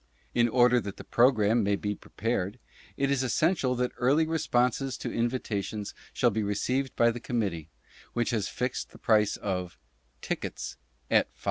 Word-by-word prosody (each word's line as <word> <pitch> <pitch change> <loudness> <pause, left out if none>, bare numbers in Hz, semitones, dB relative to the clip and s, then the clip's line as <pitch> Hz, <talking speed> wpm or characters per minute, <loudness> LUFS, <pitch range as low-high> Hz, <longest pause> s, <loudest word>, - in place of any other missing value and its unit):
In 120 0 +3
order 125 0 +4
that 100 -1 -7
the - - -8
Programme 115 -2 +3
may 100 -1 +2
be 105 +1 -2
prepared, 105 0 -3 0.4
it 140 0 +1
is 140 -2 +2
essential 135 0 +1
that 125 0 0
early 140 +6 +3
re 160 0 -1
sponses 125 +1 +1
to - - -5
invitations 110 -4 -2 0.2
shall 120 - +2
be 110 +1 -1
received 125 +6 -1
by 115 0 +4
the 120 - -6
Committee, 100 - -2 0.4
which 120 0 0
has 110 -4 0
fixed 125 0 -3
the - - -15
price 105 -2 +3
of 90 -3 -3 0.4
TICKETS - - -4 0.3
AT - - +4
$5. - - -31
120 Hz, 165 wpm, -28 LUFS, 105-125 Hz, 0.4 s, order